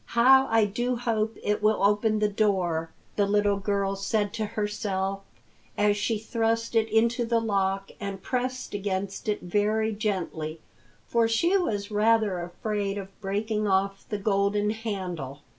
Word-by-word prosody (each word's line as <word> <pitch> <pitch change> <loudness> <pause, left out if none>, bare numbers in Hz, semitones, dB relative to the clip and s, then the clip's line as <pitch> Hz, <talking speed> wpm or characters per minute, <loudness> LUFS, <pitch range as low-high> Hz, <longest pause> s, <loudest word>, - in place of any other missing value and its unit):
"How 265 +3 +7
I 225 -1 +4
do 240 +5 -1
hope 225 -2 -1
it 210 0 0
will 215 -1 +2
open 210 +2 +3
the 210 0 +2
door!" 185 -6 0 0.3
the 205 -1 +3
little 205 0 +2
girl 195 0 0
said 205 +1 -1
to 220 -1 -2
herself 195 -2 -1 0.6
as 205 0 +3
she 215 +2 0
thrust 230 +1 -1
it 225 -1 +2
into 230 +2 +2
the 230 0 +1
lock 195 -3 -1
and 200 -2 -4
pressed 255 +3 -3
against 200 +2 -3
it 210 - -1
very 215 +4 +1
gently, 175 -7 -3 0.5
for 230 -1 +2
she 335 - +2
was 215 - -1
rather 215 -2 +2
afraid 200 +3 -3
of 195 0 -9
breaking 210 +2 -1
off 195 0 +1
the 210 - -1
golden 205 +1 +1
handle. 185 - -5
210 Hz, 150 wpm, -27 LUFS, 195-225 Hz, 0.6 s, How